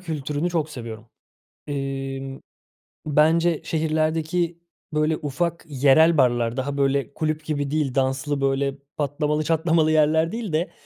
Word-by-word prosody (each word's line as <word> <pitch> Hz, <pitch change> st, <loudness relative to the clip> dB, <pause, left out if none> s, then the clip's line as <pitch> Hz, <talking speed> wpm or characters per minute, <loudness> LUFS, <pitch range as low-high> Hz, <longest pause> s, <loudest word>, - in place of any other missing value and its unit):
kültürünü 155 Hz, -1 st, -3 dB
çok 160 Hz, -3 st, -1 dB
seviyorum. 115 Hz, -4 st, -8 dB, 0.6 s
Emm, 135 Hz, -1 st, -4 dB, 0.7 s
bence, 160 Hz, +2 st, +3 dB
şehirlerdeki, 160 Hz, +2 st, 0 dB, 0.3 s
böyle, 155 Hz, +1 st, +1 dB
ufak 170 Hz, +4 st, -2 dB
yerel 145 Hz, +4 st, +4 dB
barlar 120 Hz, -2 st, +2 dB
daha, 140 Hz, +2 st, -2 dB
böyle, 140 Hz, 0 st, +1 dB
kulüp 155 Hz, 0 st, -2 dB
gibi 145 Hz, -2 st, -2 dB
değil, 145 Hz, -4 st, 0 dB
danslı, 135 Hz, +2 st, 0 dB
böyle, 135 Hz, 0 st, 0 dB, 0.2 s
patlamalı, 150 Hz, +1 st, 0 dB
çatlamalı 160 Hz, 0 st, +2 dB
yerler 160 Hz, +2 st, +3 dB
değil 220 Hz, -7 st, -4 dB
de 165 Hz, +3 st, 0 dB
150 Hz, 120 wpm, -23 LUFS, 135-160 Hz, 0.7 s, yerel